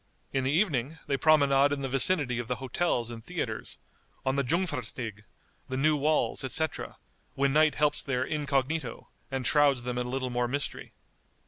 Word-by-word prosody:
In 135 -1 +1
the 130 - +1
evening 155 - +1
they 140 - 0
promenade 140 -2 +4
in 140 -1 -2
the - - -1
vicinity 135 -1 +3
of 120 - -4
the 125 - -1
hotels 130 -2 -1
and 115 -1 -8
theatres, - - -4 0.5
on 130 0 +1
the 140 - +1
Jungfernstig, 125 - -2 0.4
the 130 - -2
new 150 +3 +3
walls, 150 0 +1
etc., 130 - -2 0.4
when 140 0 +1
night 155 0 +4
helps 150 -1 +2
their 130 -2 -1
incognito, 140 -2 -2 0.2
and 135 -2 -3
shrouds 145 -4 +3
them 125 0 -2
in 125 - -2
a - - -5
little 130 0 -2
more 120 0 0
mystery. 140 +3 -3
135 Hz, 175 wpm, -29 LUFS, 125-150 Hz, 0.5 s, promenade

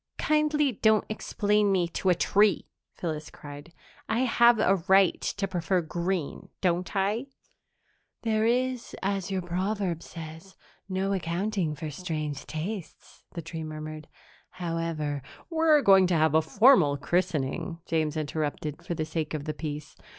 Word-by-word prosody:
"Kindly 300 -2 +2
don't 220 -1 +3
explain 210 -1 +1
me 180 -3 +2
to 185 - -1
a 180 - +5
tree!" 205 +4 +3 0.3
Phyllis 155 -3 -4
cried. 145 +2 -11 0.4
"I 225 +3 +1
have 240 -2 +5
a 195 -2 +3
right 190 -1 +5
to 200 -1 -2
prefer 180 0 0
green, 170 0 -3
don't 180 0 0
I?" 205 +7 0 1.0
"There 220 -1 +1
is, 250 +1 0
as 195 -1 -1
your 190 -2 -2
proverb 180 0 -2
says, 165 +3 -10 0.3
no 190 +1 0
accounting 180 -1 -1
for 155 +1 -5
strange 155 -3 -4
tastes," 175 +4 -7
the 170 - -5
tree 160 0 -6
murmured. 155 0 -7 0.4
"However 165 -5 -3
" - - -23
"We're 320 -3 +4
going 195 -2 +6
to 180 - +1
have 155 -1 +3
a 160 - +5
formal 190 - +5
christening," 170 0 -1
James 155 -1 0
interrupted, 150 0 -3
for 170 - -3
the 155 - -2
sake 155 -1 -3
of 145 -1 -5
the 155 - -2
peace. 150 -1 -6
180 Hz, 145 wpm, -27 LUFS, 155-205 Hz, 1.0 s, going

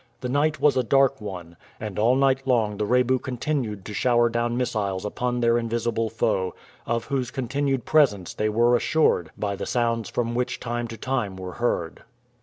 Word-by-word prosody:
The 125 - -3
night 150 +4 +1
was 150 - +4
a 130 - +3
dark 135 0 +3
one, 90 -5 -7 0.2
and 105 -2 -5
all 120 +4 +4
night 135 0 +2
long 110 -5 +1
the 105 - -1
Rebu 125 +1 +3
continued 125 -6 -3
to 105 - -6
shower 120 +1 +3
down 120 +1 -1
missiles 105 -6 -1
upon 125 +4 -2
their 115 0 +3
invisible 115 -1 -1
foe, 95 -4 -1 0.3
of 115 0 -1
whose 130 -3 -2
continued 135 0 -1
presence 120 - +2
they 110 - 0
were 120 +3 +3
assured 120 - +2
by 100 -1 -2
the 100 - -5
sounds 115 -2 0
which 120 +1 0
from - - -14
time 120 0 -3
to 115 0 -8
time 120 -5 -2
were 95 -1 -6
heard. 100 -9 -2
120 Hz, 185 wpm, -24 LUFS, 105-130 Hz, 0.3 s, was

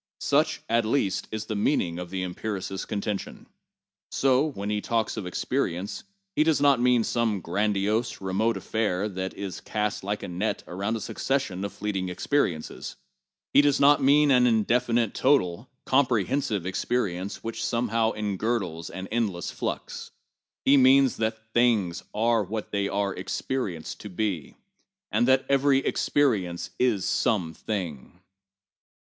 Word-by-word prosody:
Such, 155 +2 +1
at 115 +1 +2
least, 110 -3 0
is 110 0 -4
the 110 - -4
meaning 95 - 0
of 90 -1 -6
the 95 0 -3
empiricist's 95 0 -4
contention. 105 -1 -4 0.6
So, 135 +2 +2
when 105 -8 -4
he 105 -1 -1
talks 115 0 -1
of 105 -5 -5
experience, 95 - -2 0.3
he 155 - +4
does 160 -1 +2
not 140 -3 +4
mean 125 -2 +4
some 110 -3 0
grandiose, 105 +5 0
remote 100 +3 0
affair 105 -1 -1
which 95 -2 -4
is 100 -3 -6
cast 105 -2 -2
like 105 +2 -3
a - - -4
net 100 +4 -2
around 100 +5 -2
a - - -7
succession 120 -10 -2
of 100 - -3
fleeting 95 -3 -3
experiences; 90 - -1 0.6
he - - +8
does 145 -1 +2
not 145 +1 +6
mean 145 +2 +5
an 125 -1 +5
indefinite 115 0 +2
total, 120 -6 +1 0.2
comprehensive 120 -5 +1
experience 95 -1 -2
which 115 0 -4
some 120 0 0
how 115 0 +2
engirdles 100 -5 -2
an 95 - -6
endless 105 -7 -1
flux; - - -5 0.6
he 140 +1 +6
means 135 0 +5
that 110 0 -3
things 110 -8 +2
are 115 +1 +2
what 105 +2 -5
they 100 -1 0
are 100 -1 -1
experienced 95 -3 -4
to 105 - -8
be, 95 -5 -3 0.5
and 115 +4 +2
that 130 0 +4
every 140 0 +4
experience 95 -11 0
is 115 -7 +2
some 90 -8 +1
thing. 90 -6 -5
110 Hz, 145 wpm, -26 LUFS, 95-125 Hz, 0.6 s, he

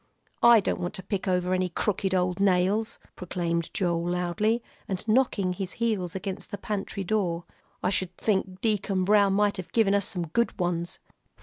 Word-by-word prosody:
"I 235 -2 +8
don't - - -1
want 175 +3 -3
to 190 - -6
pick 195 0 -3
over 180 0 +1
any 185 0 +1
crooked 190 +1 -1
old 180 0 0
nails," 200 +3 +2 0.2
proclaimed 170 -2 -2
Joel, 175 -6 0
loudly, 180 +6 0 0.2
and 190 +3 -4
knocking 215 -6 +2
his 185 0 -4
heels 205 -6 -1
against 190 0 -5
the 205 - -5
pantry 200 -1 -4
door. 180 -4 0 0.4
"I 185 - +2
sh'd 185 -2 -1
think 190 -3 -1
Deacon 200 -4 +1
Brown 200 -1 +4
might 205 0 +2
have 185 - -7
given 220 -4 +4
us 200 -1 +1
some 175 -4 -4
good 235 +7 0
ones." 175 0 -1
190 Hz, 175 wpm, -27 LUFS, 180-210 Hz, 0.4 s, I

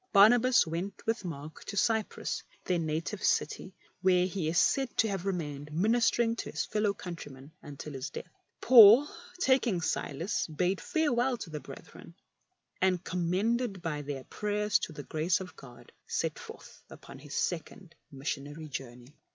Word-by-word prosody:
Barnabas 240 +5 +6
went 170 +5 -5
with 225 0 -1
Mark 155 -3 -7
to 205 - -6
Cyprus, 220 +1 0 0.2
their 180 -2 +1
native 165 +5 -3
city, 190 - 0 0.3
where 180 -1 +4
he 185 -3 -3
is 165 +2 0
said 270 +5 +2
to 225 - +4
have 195 -2 -3
remained, 150 -6 -4
ministering 230 +6 +2
to - - -5
his - - -2
fellow 210 -1 0
country 175 -6 -8
men 135 +3 -13
until 145 +1 -9
his 135 0 -5
death. - - -7 0.4
Paul, 240 +3 +9 0.3
taking 260 - +2
Silas, 175 - -2
bade 180 +4 -1
farewell 260 -5 +1
to 175 - -8
the 150 - -4
brethren, - - -12 0.7
and, 185 -1 +2
commended 195 +4 -1
by 150 -3 -2
their 140 -2 -5
prayers 210 +3 0
to - - -5
the 145 -2 -8
grace 160 +4 0
of 185 -1 -9
God, 125 -3 -14 0.2
set - - -2
forth - - -12
upon 135 - -12
his 145 +1 -9
second 175 +1 -3 0.2
missionary 145 +2 -5
journey. 130 0 -8
180 Hz, 155 wpm, -30 LUFS, 150-215 Hz, 0.7 s, Paul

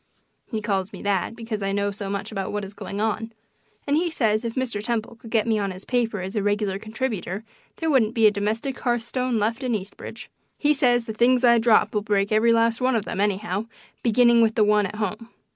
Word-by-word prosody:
He 220 -4 -4
calls 195 -2 -1
me - - -9
that 200 +2 0
because 225 -2 -5
I 195 0 -1
know 200 0 0
so 200 0 -6
much 200 +2 -4
about 195 -3 -3
what 205 -1 -3
is 195 - -10
going 200 0 -6
on; 225 +1 -1 0.5
and 285 - +1
he 340 +3 +1
says 220 -8 +1
if 230 -1 -4
Mr. 245 -6 -2
Temple 230 0 -2
could 225 - -12
get 220 -2 +2
me 220 -2 +1
on 200 -1 -1
his 185 +1 -8
paper 230 -5 0
as 190 +3 -6
a 210 - +1
regular 205 -1 0
contributor 220 -3 -4 0.3
there 325 - -3
wouldn't 235 -5 +3
be 225 -2 +4
a 210 - +7
domestic 220 +6 -2
hearth 240 -1 0
stone 250 0 -1
left 225 +4 0
in 250 -3 0
Eastridge. 195 -1 -7 0.3
He 295 0 +3
says 245 -4 +2
the 220 - -5
things 245 +3 +3
I 235 -1 +6
drop 225 -1 +4
will 210 - +1
break 205 -1 0
every 220 +2 +4
last 230 +1 +2
one 255 0 +2
of 215 -2 0
them, 195 - -3
anyhow, 205 +1 -1 0.3
beginning 235 0 +5
with 225 -1 +3
the 220 - +4
one 210 -1 +3
at 200 - -9
home. 215 +2 -4
220 Hz, 230 wpm, -24 LUFS, 205-235 Hz, 0.5 s, a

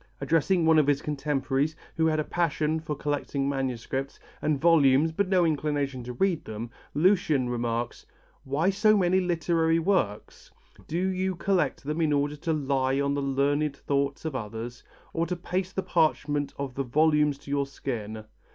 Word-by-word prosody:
Addressing 165 +4 +2
one 160 -1 +6
of 150 - +2
his 145 -1 +3
contemporaries 145 0 -1 0.2
who 160 0 +2
had 155 -1 +1
a - - +1
passion 160 -1 0
for 155 -1 -4
collecting 145 -1 -2
manuscripts 135 0 -3 0.2
and 150 -2 +1
volumes 155 -2 +4
but 195 +4 0
no 185 -3 +4
inclination 145 -4 -1
to 125 - -5
read 175 +4 0
them, 110 +2 -6 0.2
Lucian 155 -6 +3
remarks: 120 0 -2 0.4
"Why 150 +8 +1
so 215 +2 +4
many 185 -1 +3
literary 165 -2 +1
works? 165 - -1 0.4
Do 165 - -2
you 190 0 -1
collect 175 -5 0
them 150 +4 -2
in 155 -2 +2
order 145 +1 0
to 165 +3 -2
lie 135 -3 0
on 140 0 +1
the 140 - -1
learned 140 +1 0
thoughts 140 +1 -1
of 155 -4 -3
others, 115 +1 -6 0.3
or 165 0 0
to 180 - -2
paste 185 +1 -3
the 190 - -1
parchment 155 -4 +1
of 140 -2 -4
the 135 - -2
volumes 150 +2 +2
to 140 - -10
your 140 -1 0
skin? 110 -6 -5
145 Hz, 170 wpm, -27 LUFS, 135-165 Hz, 0.4 s, one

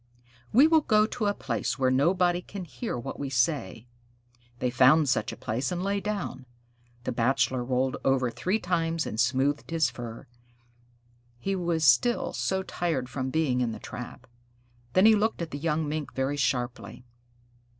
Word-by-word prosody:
We 260 +7 +7
will 320 0 +5
go 215 -6 +3
to 220 -1 -2
a 205 - +2
place 125 +1 -2
where 130 -2 +2
nobody 175 +6 +2
can 190 0 -8
hear 120 -5 -5
what 120 - -6
we 140 - -3
say." 125 -3 0 0.7
They 125 0 -1
found 135 +5 +5
such 110 -5 0
a - - -9
place 125 +4 -2
and 180 0 -2
lay 200 +1 0
down. 200 -10 -4 0.6
The - - -2
Bachelor 130 +1 +1
rolled 130 +1 0
over 130 -2 +2
three 185 - -1
times 165 -4 -1
and 110 - -5
smoothed 130 +4 +1
his 160 -6 +1
fur; 120 -2 -8 1.1
he 195 +10 -2
was 170 -3 0
still 150 - +3
so 190 0 -1
tired 160 -9 -2
from 130 0 -3
being 130 -4 +1
in 115 -2 -1
the - - -8
trap. 125 +2 -8 0.7
Then 185 - +5
he 220 - +8
looked 220 +1 +1
at 170 -2 -4
the 145 - -5
young 155 0 0
Mink 150 -3 -4
very 135 +2 0
sharply. 120 -4 -2
145 Hz, 170 wpm, -27 LUFS, 125-175 Hz, 1.1 s, he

